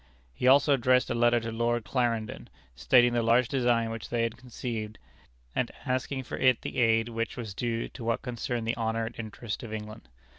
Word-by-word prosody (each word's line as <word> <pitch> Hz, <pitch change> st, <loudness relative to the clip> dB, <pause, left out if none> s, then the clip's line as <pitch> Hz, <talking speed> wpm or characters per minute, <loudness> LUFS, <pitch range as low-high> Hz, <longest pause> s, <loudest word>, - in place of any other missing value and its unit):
He 95 Hz, -, -1 dB
also 140 Hz, +2 st, +6 dB
addressed 125 Hz, -1 st, +3 dB
a -, -, +2 dB
letter 120 Hz, 0 st, +3 dB
to 115 Hz, 0 st, -4 dB
Lord 120 Hz, +1 st, 0 dB
Clarendon, 115 Hz, -4 st, -1 dB, 0.3 s
stating 120 Hz, -, +4 dB
the 120 Hz, -, +2 dB
large 115 Hz, +2 st, +3 dB
design 120 Hz, -4 st, +1 dB
which 115 Hz, -2 st, -6 dB
they 120 Hz, -1 st, 0 dB
had 115 Hz, 0 st, -1 dB
conceived, 115 Hz, -3 st, -6 dB, 0.6 s
and -, -, 0 dB, 0.2 s
asking 130 Hz, +1 st, -1 dB
for -, -, -6 dB
it 130 Hz, -2 st, +4 dB
the -, -, -3 dB
aid 115 Hz, -1 st, +3 dB
which 115 Hz, 0 st, -3 dB
was 110 Hz, -5 st, -5 dB
due 115 Hz, +2 st, -2 dB
to 120 Hz, -, -10 dB
what 115 Hz, 0 st, -1 dB
concerned 120 Hz, -2 st, -3 dB
the 115 Hz, -, +1 dB
honor 115 Hz, 0 st, -1 dB
and 115 Hz, -, -6 dB
interest 110 Hz, +1 st, -5 dB
of 115 Hz, -4 st, -8 dB
England. 110 Hz, -2 st, -7 dB
115 Hz, 195 wpm, -28 LUFS, 115-125 Hz, 0.6 s, also